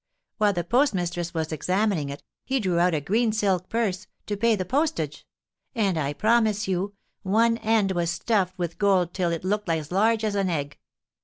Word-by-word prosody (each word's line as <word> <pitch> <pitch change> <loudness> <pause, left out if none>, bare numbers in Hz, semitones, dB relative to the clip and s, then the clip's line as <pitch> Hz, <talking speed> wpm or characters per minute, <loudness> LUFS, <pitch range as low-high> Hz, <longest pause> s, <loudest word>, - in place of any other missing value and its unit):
While 210 -1 +3
the 175 -2 -2
postmistress 175 - 0
was 160 -1 -2
examining 180 -1 0
it, 140 +1 -8 0.2
he 270 0 0
drew 185 -6 0
out 175 -1 +3
a - - +1
green 220 - +1
silk 195 -4 0
purse, 200 -5 -1 0.2
to 205 - -2
pay 230 +2 +2
the 185 -2 -3
postage; 300 - -1 0.5
and, 200 -6 +1
I 145 -2 -1
promise 215 +2 +2
you, 190 +2 -2 0.3
one 230 +4 +2
end 215 -3 +2
was 175 -2 0
stuffed 185 +1 0
with 175 -2 -4
gold 190 -4 +2
till 180 -3 0
it 165 0 -3
looked 205 0 -1
as 160 -2 -1
large 220 +4 +2
as 215 -1 0
an 195 -2 0
egg. 145 -3 -3
190 Hz, 185 wpm, -25 LUFS, 175-215 Hz, 0.5 s, While